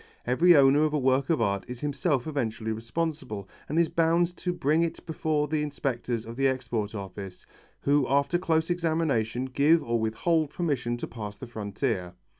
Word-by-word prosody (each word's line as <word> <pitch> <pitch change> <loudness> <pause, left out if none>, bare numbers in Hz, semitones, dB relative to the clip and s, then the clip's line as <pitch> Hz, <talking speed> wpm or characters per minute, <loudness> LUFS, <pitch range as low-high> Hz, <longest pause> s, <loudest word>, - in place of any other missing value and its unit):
Every 165 +8 +5
owner 140 +1 +6
of 155 -1 +1
a - - +2
work 130 +1 +2
of 160 -7 +2
art 100 -2 0
is 125 -1 -7
himself 145 -2 0
eventually 115 -7 -2
responsible, 115 - -3 0.2
and 155 - -1
is 170 -1 +4
bound 170 +2 +2
to 180 - -2
bring 160 -2 +1
it 170 -1 -2
before 155 -2 0
the 155 0 0
inspectors 125 -5 -2
of 115 +1 -8
the 135 0 +3
Export 115 -5 -2
Office, 95 -2 -7 0.4
who 140 -1 +2
after 140 +5 +2
close 165 -1 +1
examination 155 -9 0
give 145 +5 +3
or 115 0 0
withhold 150 +8 +1
permission 140 -7 -1
to - - -4
pass 105 -3 -7
the 130 - -8
frontier. 105 -4 -3
135 Hz, 175 wpm, -27 LUFS, 115-160 Hz, 0.4 s, owner